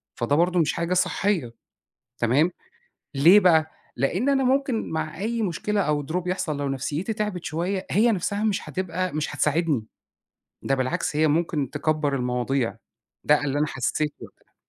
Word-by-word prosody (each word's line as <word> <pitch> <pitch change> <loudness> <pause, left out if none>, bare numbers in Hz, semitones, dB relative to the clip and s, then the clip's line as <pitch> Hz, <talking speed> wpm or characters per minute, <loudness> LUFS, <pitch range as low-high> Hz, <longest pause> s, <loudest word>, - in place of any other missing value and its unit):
فده 120 +5 0
برضو 175 +3 +2
مش 160 - +2
حاجة 170 +1 -1
صحية، 180 - 0 0.7
تمام، 135 +9 +3 0.7
ليه 170 +9 +7
بقى؟ 160 -4 +4 0.2
لأن 180 - 0
أنا 270 -1 +2
ممكن 260 -2 +1
مع 160 -1 -3
أي 230 +4 -2
مشكلة 205 +2 -1
أو 150 -5 0
Drop 180 +3 -2
يحصل 170 -5 -2
لو 140 -1 -2
نفْسيتي 150 - -2
تعبِت 210 -5 -3
شوية 175 +5 -2
هي 230 +4 +4
نَفْسها 205 +1 -1
مش 210 -2 -1
هتبقى 185 -1 -2
مش 155 0 -2
هتساعدني، 150 -6 +1 0.8
ده 135 - +1
بالعكس 130 +2 -1
هي 155 +1 +3
ممكن 150 -3 0
تكّبر 155 -2 0
المواضيع، 125 0 -1 0.5
ده 150 0 +3
اللي 140 0 -1
أنا 150 - +2
حسيته 150 +2 -2
وقتها. - - -19
160 Hz, 155 wpm, -24 LUFS, 145-190 Hz, 0.8 s, ليه